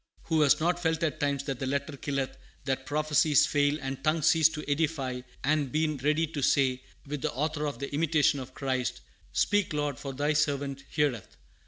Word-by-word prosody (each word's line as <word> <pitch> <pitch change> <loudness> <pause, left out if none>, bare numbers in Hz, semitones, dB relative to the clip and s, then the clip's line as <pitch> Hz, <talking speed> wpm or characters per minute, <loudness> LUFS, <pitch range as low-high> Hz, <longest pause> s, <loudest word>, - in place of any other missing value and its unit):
Who 160 -2 +1
has 145 -2 +5
not 175 +2 +1
felt 160 -1 0
at 155 -1 -1
times 140 -2 0
that 135 -3 -4
the 135 - -2
letter 140 +2 -2
killeth, 140 -1 -3 0.3
that 130 -1 -2
prophecies 150 0 +3
fail, 145 0 +2
and 135 -1 -5
tongues 155 0 +1
cease 165 -1 +5
to 155 -1 -7
edify, 145 -4 -1 0.2
and 145 -1 +1
been 155 -1 0
ready 150 +4 +1
to 155 -2 -5
say, 130 -1 +2 0.2
with 145 -1 -5
the - - -1
author 150 +3 -1
of 145 - -4
the 140 +1 -6
Imitation 150 -1 +2
of 130 0 -9
Christ: 130 -2 -2 0.3
"Speak, 205 -5 +1
Lord, 145 -3 -2
for 140 - -5
thy 145 +3 0
servant 140 -2 -1
heareth. 120 - -1
145 Hz, 190 wpm, -29 LUFS, 135-155 Hz, 0.3 s, has